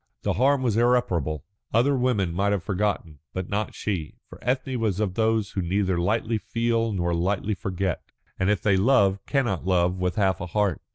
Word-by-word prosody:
The - - +1
harm 130 +6 +2
was 115 -4 +1
irreparable. 115 - +1 0.3
Other 135 +5 +4
women 120 -9 +1
might 100 +3 +1
have 95 -4 -1
forgotten, 95 -6 -2
but 95 -1 -4
not 105 +1 -2
she. 90 -8 -3
For - - -13
Ethne 130 0 -1
was 105 -4 0
of 105 -4 0
those 110 -1 +1
who 95 - -2
neither 95 0 0
lightly 110 +4 0
feel 115 0 0
nor 85 -3 -1
lightly 95 +5 0
forget, 95 -1 -2 0.4
and 95 - +2
if 105 -2 +1
they 100 -3 +3
love 100 -3 +3
cannot 120 - 0
love 90 0 +2
with 90 -1 -1
half 95 -4 +1
a 90 - -4
heart. 100 -1 0
100 Hz, 185 wpm, -25 LUFS, 90-115 Hz, 0.4 s, Other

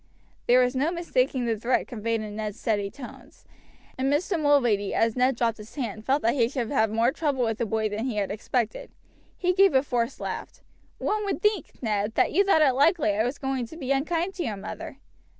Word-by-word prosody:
There 250 +1 +6
was 250 +1 +1
no 285 +6 +1
mistaking 265 -7 0
the 230 -1 +1
threat 235 +4 0
conveyed 230 -2 -2
in 210 -1 -7
Ned's 215 0 -4
steady 205 -3 0
tones, 245 +4 -12 0.5
and 265 +1 +1
Mr. 335 +4 0
Mulready, 240 -9 +2
as 225 -1 +2
Ned 255 +1 +2
dropped 230 -1 0
his 210 +1 -12
hand, 220 -6 -4
felt 275 +2 +2
that 230 - +3
he 235 -4 +2
should 245 -4 -3
have 220 -6 +2
more 225 +3 +2
trouble 280 -4 -1
with 225 -1 -1
the 235 - 0
boy 220 +1 0
than 215 +3 -3
he 250 -4 -2
had 200 -2 -1
expected. 220 +2 -2 0.5
He 360 0 +1
gave 390 -4 +4
a 265 - +5
forced 245 -2 -2
laugh. - - -6 0.3
"One 425 0 -1
would 400 - -2
think, 420 -7 0
Ned, 210 -1 -1
that - - +3
you 395 - +4
thought 355 -6 +4
it 270 -3 +4
likely 290 - +3
I 215 - +2
was 245 +4 -2
going 265 -3 -2
to 320 - -11
be 275 -4 -3
unkind 330 +7 0
to 365 -2 -3
your 215 -8 -3
mother." 195 - -7
250 Hz, 220 wpm, -26 LUFS, 220-290 Hz, 0.5 s, There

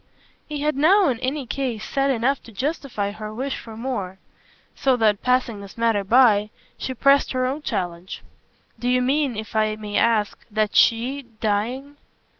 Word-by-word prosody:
He 295 -1 -4
had 300 -1 0
now 355 +6 +4
in 240 -3 -1
any 265 +2 -2
case 240 -4 -3
said 275 0 0
enough 260 +2 +1
to 230 - -12
justify 245 -4 -3
her 215 +1 -7
wish 260 +5 -3
for 220 -1 -10
more; 210 -7 -4 0.6
so 265 -2 +1
that, 215 -3 +2
passing 250 -4 +1
this 200 +2 -12
matter 230 -3 +1
by, 210 -1 +4 0.3
she 260 - -5
pressed 275 +3 +3
her 255 0 0
own 270 +4 -2
challenge. 175 -7 -4 0.6
"Do 245 - -1
you 250 0 +3
mean, 270 -2 +1
if 220 +1 -7
I 215 0 +2
may 210 -1 -4
ask, 220 -3 +1
that 215 -1 -1
SHE, 245 +5 +3 0.2
dying 245 +7 -2
240 Hz, 170 wpm, -23 LUFS, 215-270 Hz, 0.6 s, now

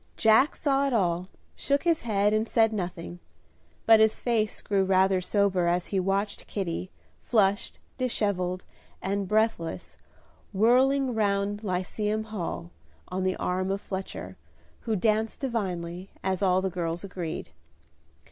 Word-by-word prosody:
Jack 225 +6 +5
saw 280 -1 +1
it 270 - -1
all, 180 -4 +1 0.3
shook 280 0 0
his 335 -2 +2
head 210 -2 +1
and 215 +1 +1
said 225 -1 +3
nothing; 175 -3 -5 0.7
but 225 -1 +7
his 220 0 +3
face 225 -3 0
grew 200 -2 +1
rather 190 0 +3
sober 185 -1 +1
as 175 +1 +1
he 195 - +3
watched 195 +2 -1
Kitty, 185 -2 -3 0.3
flushed, 205 -3 +1 0.2
dishevelled, 195 -7 -1 0.4
and 200 0 -2
breathless, 210 - -1 0.6
whirling 255 +5 +3
round 205 -1 0
Lyceum 210 +3 -1
Hall, 180 -5 -5 0.4
on 185 +1 -2
the 185 0 +1
arm 185 +1 -1
of 195 +1 -1
Fletcher, 190 -1 -6 0.4
who 225 -2 -2
danced 220 +2 +1
divinely, 185 -7 -3
as 190 0 -1
all 185 -1 +3
the 190 - -1
girls 170 -1 -3
agreed. 180 -4 -5
200 Hz, 135 wpm, -27 LUFS, 185-220 Hz, 0.7 s, but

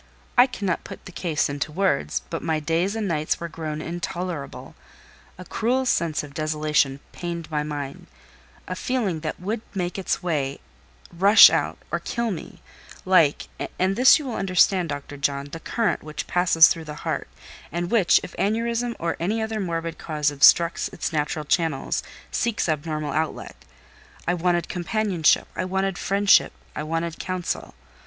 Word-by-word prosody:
I 245 +1 +7
cannot 200 -8 -2
put - - -10
the - - -9
case 165 -3 -1
into 145 +1 -3
words, 185 -4 0
but 165 - -3
my 160 -2 0
days 165 +6 0
and 220 -2 -2
nights 155 -3 -1
were 170 - -4
grown 155 -1 -5
intolerable: 175 -3 -5 0.6
a 185 - -9
cruel 250 +8 0
sense 170 -11 +1
of 145 -1 -10
desolation 150 -2 0
pained 170 -2 -6
my 150 -1 0
mind: 145 -2 -6 0.6
a - - -3
feeling 225 - -1
that 155 -1 -5
would 210 +5 -3
make 180 0 -2
its 190 - -2
way, 145 -5 -1 0.5
rush 200 +5 +8
out, - - 0
or - - 0
kill 235 -1 -2
me—like 170 -1 -1 0.3
(and 190 +1 +1
this 255 +4 +7
you 300 - -6
will 250 - -4
understand, 185 -2 +3
Dr. 145 0 -6
John) 140 0 -1
the 165 - -6
current 230 +5 -1
which 155 -1 -6
passes 170 -3 +6
through 165 -1 -2
the 150 -1 -9
heart, - - -2 0.4
and 175 +3 -3
which, 220 -7 +5
if - - -8
aneurism 230 +3 0
or 165 0 -2
any 205 +7 0
other 220 0 -2
morbid 165 -3 -3
cause 150 -2 -1
obstructs 165 +4 +5
its 175 -3 -4
natural 150 0 -1
channels, 155 -3 0 0.3
seeks 230 -5 0
abnormal 155 -1 -2
outlet. 160 +2 -3 0.7
I 175 - +3
wanted 175 0 0
companionship, 180 -2 +1
I - - -2
wanted 190 0 -1
friendship, 200 +1 +4 0.2
I - - -3
wanted 165 +2 -3
counsel. 185 - -4
170 Hz, 160 wpm, -24 LUFS, 155-195 Hz, 0.7 s, rush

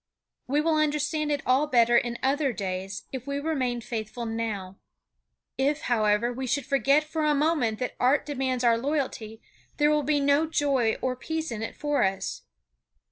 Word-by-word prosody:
We 285 +4 +2
will 320 0 +2
understand 300 0 0
it 290 -1 -1
all 265 +4 +3
better 240 -3 +4
in 235 0 +1
other 275 +1 +2
days 195 0 -4
if 260 0 -6
we 280 0 -2
remain 260 -6 -1
faithful 225 +1 -5
now. 215 -4 -4 0.8
If, 285 +3 +1
however, 220 0 +1
we 260 +1 -4
should 285 +3 0
forget 275 +3 +3
for 310 +1 -3
a 300 -1 +3
moment 285 -7 +1
that 250 +1 -4
art 265 +4 +3
demands 260 -3 -2
our 230 -1 +4
loyalty, 260 -5 -3 0.3
there 295 0 +4
will 300 0 +3
be 290 +1 +1
no 285 +3 +3
joy 275 -7 +1
or 255 -1 0
peace 320 +3 -4
in 220 -2 -4
it 225 - -5
for 295 -1 0
us. 190 0 -1
265 Hz, 175 wpm, -27 LUFS, 230-295 Hz, 0.8 s, better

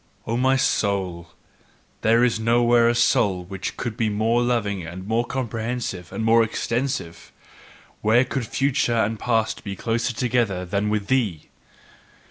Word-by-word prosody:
O 115 - -2
my 130 +2 +3
soul, 95 -8 0 0.7
there 115 +2 +4
is 120 -3 +2
nowhere 120 +1 +4
a 120 - +1
soul 100 -5 +2
which 95 0 -6
could 120 -3 -4
be 110 -1 0
more 110 +3 +1
loving 110 -6 0
and 90 +3 -8
more 115 +2 +1
comprehensive 115 -7 -4
and 110 - -4
more 115 +1 +5
extensive! 115 -5 -3 0.7
Where 115 +4 +4
could 125 -2 -3
future 135 -3 +1
and 110 0 0
past 115 -2 0
be 100 -2 -5
closer 115 +4 -1
together 115 -7 0
than 100 +4 -1
with 105 -1 -1
thee? 105 -10 -1
115 Hz, 145 wpm, -23 LUFS, 100-120 Hz, 0.7 s, more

